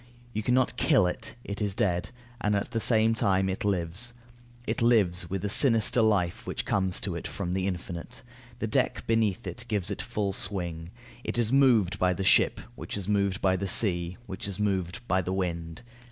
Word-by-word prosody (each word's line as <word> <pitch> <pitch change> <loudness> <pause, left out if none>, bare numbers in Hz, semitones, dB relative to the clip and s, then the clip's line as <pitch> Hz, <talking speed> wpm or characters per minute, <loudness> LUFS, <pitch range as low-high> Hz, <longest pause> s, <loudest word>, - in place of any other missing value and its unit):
You 110 - -1
can 125 +3 +1
not 130 -1 +1
kill 135 - +4
it, 90 - -3
it 100 +1 -5
is 100 -2 -1
dead; 90 -4 0 0.3
and 105 0 +1
at 100 - -2
the 115 - -1
same 110 0 +3
time 95 -3 +1
it 95 0 -3
lives. 100 +4 0 0.5
It - - -2
lives 95 -8 +3
with 95 +2 -3
a - - +1
sinister 115 +1 +4
life 100 -6 +1
which - - -3
comes 95 -2 +1
to 95 - -3
it 85 - -5
from 90 -3 -4
the 95 0 -1
infinite. 90 -2 -6 0.3
The - - -3
deck - - 0
beneath 115 -1 +1
it 120 - -6
gives 105 -3 0
it 100 - -2
full 100 -2 -2
swing. 85 -5 -2 0.3
It - - -3
is 120 0 +2
moved 115 -9 +4
by 90 0 +3
the 95 - -3
ship, 95 - +4
which - - -6
is 100 -2 -5
moved 100 -2 0
by 95 -1 +3
the 100 +1 -2
sea, 90 -3 +2
which 95 -1 -5
is 100 0 -4
moved 100 +2 -2
by 95 +1 +2
the 90 +1 -3
wind. 85 -2 -3
100 Hz, 200 wpm, -28 LUFS, 90-110 Hz, 0.5 s, kill